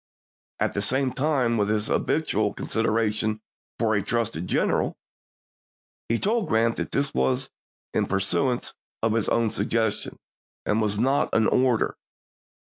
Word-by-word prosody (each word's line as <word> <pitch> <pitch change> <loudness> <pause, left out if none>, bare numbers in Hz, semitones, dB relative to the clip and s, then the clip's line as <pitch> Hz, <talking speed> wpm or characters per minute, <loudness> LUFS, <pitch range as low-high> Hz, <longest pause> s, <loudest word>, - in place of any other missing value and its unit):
At - - 0
the 100 - -1
same 130 +4 +1
time, 135 -5 +1
with 105 -1 +1
his 105 0 +1
habitual 110 -10 0
consideration 110 -1 0 0.4
for 110 -2 +1
a 105 - +2
trusted 115 -6 -2
general, - - +1 1.1
he 115 - +2
told 220 - +1
Grant 115 +1 +2
that - - -3
this 140 0 0
was 65 0 +1 0.4
in - - +1
pur 100 - 0
suance 120 +6 0 0.3
of 115 -1 +2
his 115 -2 +1
own 115 -2 +2
suggestion, 110 +1 -1 0.5
and 105 +2 +1
was 105 -1 0
not 135 +5 +2
an 115 - +4
or 125 -1 +3
der. - - -1
115 Hz, 145 wpm, -25 LUFS, 105-125 Hz, 1.1 s, an